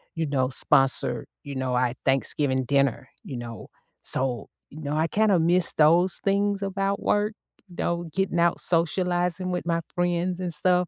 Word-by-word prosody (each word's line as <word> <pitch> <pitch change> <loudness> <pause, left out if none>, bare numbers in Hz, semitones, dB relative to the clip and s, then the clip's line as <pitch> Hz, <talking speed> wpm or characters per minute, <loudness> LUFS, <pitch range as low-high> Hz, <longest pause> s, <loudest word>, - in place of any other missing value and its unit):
you 165 0 -1
know, 130 -2 0
sponsor, 135 0 +2 0.2
you 140 -1 -7
know, 130 -1 -2
a 125 -1 +1
Thanksgiving 135 0 +1
dinner, 140 -2 0
you 130 - -7
know? 115 -1 -8 0.4
So, 125 -4 +1 0.2
you 155 +2 -11
know, 145 0 -3
I 160 +1 +1
kinda 205 0 +2
miss 175 +2 +2
those 170 +4 +4
things 200 0 +1
about 195 0 -2
work, 210 +1 +1 0.4
though, 175 -1 -2
getting 190 -2 0
out 170 0 +2
socializing 180 +1 0
with 180 -1 -3
my 165 0 0
friends 175 +1 0
and 180 -2 -3
stuff. 180 +3 +2
170 Hz, 160 wpm, -25 LUFS, 140-185 Hz, 0.4 s, those